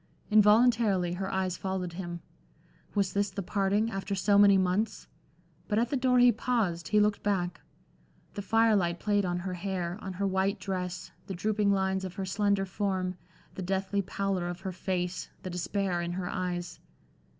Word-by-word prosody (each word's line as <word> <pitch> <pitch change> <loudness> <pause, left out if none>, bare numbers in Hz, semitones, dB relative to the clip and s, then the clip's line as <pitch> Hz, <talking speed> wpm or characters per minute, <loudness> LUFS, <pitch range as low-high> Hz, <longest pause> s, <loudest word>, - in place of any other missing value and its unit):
Involuntarily, 210 -4 +4
her 190 +2 -3
eyes 190 -1 -1
followed 190 -2 -3
him. 175 -1 -6 0.7
Was 200 -2 +1
this 200 0 +1
the 195 +1 -5
parting, 205 +4 +1
after 195 0 -3
so 200 +2 +2
many 200 -1 +7
months? 190 +4 0 0.6
But 210 - 0
at 235 +1 +2
the - - +1
door 255 -1 +3
he 245 0 +7
paused, 205 -10 -1
he 210 - +3
looked 210 0 +2
back. 185 -4 -1 0.7
The 205 - -4
firelight 205 -6 +2
played 205 -2 +1
on 175 -1 -1
her 180 +1 -4
hair, 180 0 -3
on 190 - -5
her 200 +2 -2
white 195 +1 0
dress, 185 -2 -4 0.2
the 195 - -4
drooping 210 +2 +1
lines 190 -1 +1
of 185 -1 -6
her 195 - -3
slender 200 +1 +1
form, 185 -2 -2 0.4
the - - -6
deathly 195 +2 -1
pallor 195 -2 -2
of 175 +1 -5
her 190 -1 -4
face, 180 -1 -3
the 185 - -5
despair 180 0 -1
in 175 0 -3
her 180 0 -3
eyes.... 180 -2 -3
190 Hz, 170 wpm, -29 LUFS, 180-205 Hz, 0.7 s, many